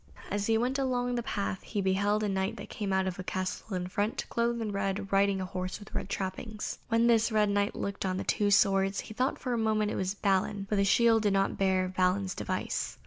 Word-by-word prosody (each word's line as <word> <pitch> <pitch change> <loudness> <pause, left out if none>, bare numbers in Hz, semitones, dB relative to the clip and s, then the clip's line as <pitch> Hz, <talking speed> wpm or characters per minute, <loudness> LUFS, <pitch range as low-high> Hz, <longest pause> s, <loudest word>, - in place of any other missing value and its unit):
As 205 0 -1
he 225 -1 +3
went 255 +4 0
along 245 -2 0
the 240 - 0
path 200 -6 -3
he 210 - -4
beheld 200 +2 +1
a - - +1
Knight 195 +3 -2
come 205 -2 -2
out 190 0 +2
of 185 -1 -3
a - - -3
castle 185 +2 -3
in 180 -1 -2
front, 205 +4 -1
clothed 235 0 0
in 220 -2 -2
red, 195 0 -2
riding 195 0 +3
a 185 - -2
horse 185 0 -4
with 205 - -13
red - - -3
trappings. 200 +3 -4
When 230 0 +3
this 230 -1 +4
red 210 -1 +3
Knight 200 0 +1
looked 200 0 -3
on 185 -1 -1
the - - -2
two 205 -1 +1
swords, 195 0 +3
he - - -10
thought 255 +4 0
for 250 - -3
a 235 - 0
moment 215 -1 +1
it - - -3
was 190 +1 -1
Balin, 195 0 0
but 210 - 0
the 200 - +3
shield 225 +2 +4
did 205 -2 +2
not 195 0 +1
bear 190 -1 +2
Balin's 185 +1 +1
device. - - -3
200 Hz, 235 wpm, -30 LUFS, 190-220 Hz, -, this